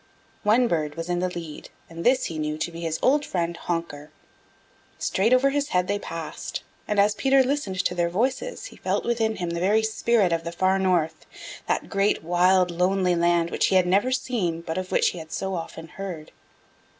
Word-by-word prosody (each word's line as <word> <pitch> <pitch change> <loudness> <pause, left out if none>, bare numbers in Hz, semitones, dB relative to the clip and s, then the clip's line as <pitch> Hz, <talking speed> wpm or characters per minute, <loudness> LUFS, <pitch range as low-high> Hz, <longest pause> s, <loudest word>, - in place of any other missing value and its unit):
One 230 +4 +4
bird 155 -6 -1
was 165 +1 -5
in 175 0 0
the 185 +1 0
lead 165 -4 -8 0.2
and 165 0 -8
this 255 +1 +3
he 160 -2 -4
knew 150 0 -2
to 170 +2 -3
be 165 0 -8
his 160 -1 -2
old 290 +3 +4
friend, 170 -7 -2
Honker. 165 -4 -4 0.9
Straight 205 +5 +1
over 260 +2 +4
his 285 0 0
head 180 -5 +1
they 205 0 0
passed 165 -5 -6 0.2
and 210 -1 0
as 205 +1 +4
Peter 270 +4 +3
listened 250 -9 -1
to - - +1
their 175 -1 0
voices 260 - -2
he - - -10
felt - - -1
within 225 -2 0
him 175 -2 -3
the 170 - -2
very 210 +5 +3
spirit 220 -4 +2
of 165 0 -1
the 170 - -4
Far 190 +2 +1
North, 170 -4 0 0.4
that - - -1
great, 195 -2 +1
wild, 180 +2 +3
lonely 180 +1 +1
land 170 0 +2
which - - +2
he 190 - +1
had 185 -1 +5
never 200 +8 +2
seen 220 -11 -1
but 165 +1 -3
of 185 0 -6
which - - +3
he 175 - -7
had 160 -1 -10
so 190 0 -3
often 165 -1 -6
heard. 175 -4 -7
180 Hz, 205 wpm, -25 LUFS, 170-215 Hz, 0.9 s, had